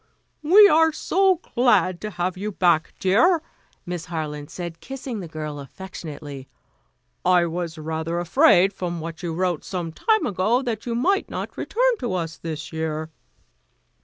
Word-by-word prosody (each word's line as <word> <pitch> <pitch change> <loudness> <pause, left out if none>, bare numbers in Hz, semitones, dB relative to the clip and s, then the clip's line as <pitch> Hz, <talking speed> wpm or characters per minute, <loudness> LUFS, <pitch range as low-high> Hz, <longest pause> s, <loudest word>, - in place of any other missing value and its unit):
"We 390 +7 +8
are 320 -3 +5
so 380 +4 +2 0.2
glad 240 -7 +3
to 215 - -4
have 180 -2 -2
you 205 +3 -4
back, 175 -4 +2
dear," 240 - +4 0.5
Miss 175 -2 -5
Harland 150 -3 -5
said, 170 -2 -7
kissing 265 -4 -6
the 180 - -6
girl 155 -2 -6
affectionately. 145 -3 -9 0.8
"I 180 -1 +4
was 170 -1 -4
rather 160 +2 -3
afraid 195 - +4
from 175 -2 -4
what 160 0 -7
you 175 - -3
wrote 175 -1 -1
some 175 -3 -4
time 435 - +1
ago, 215 +7 +1
that 230 -2 -4
you 235 - -1
might 385 - +1
not - - -5
return - - +1
to 235 -6 -2
us 165 -2 -3
this 160 -1 -6
year." 160 0 -3
180 Hz, 155 wpm, -23 LUFS, 160-240 Hz, 0.8 s, We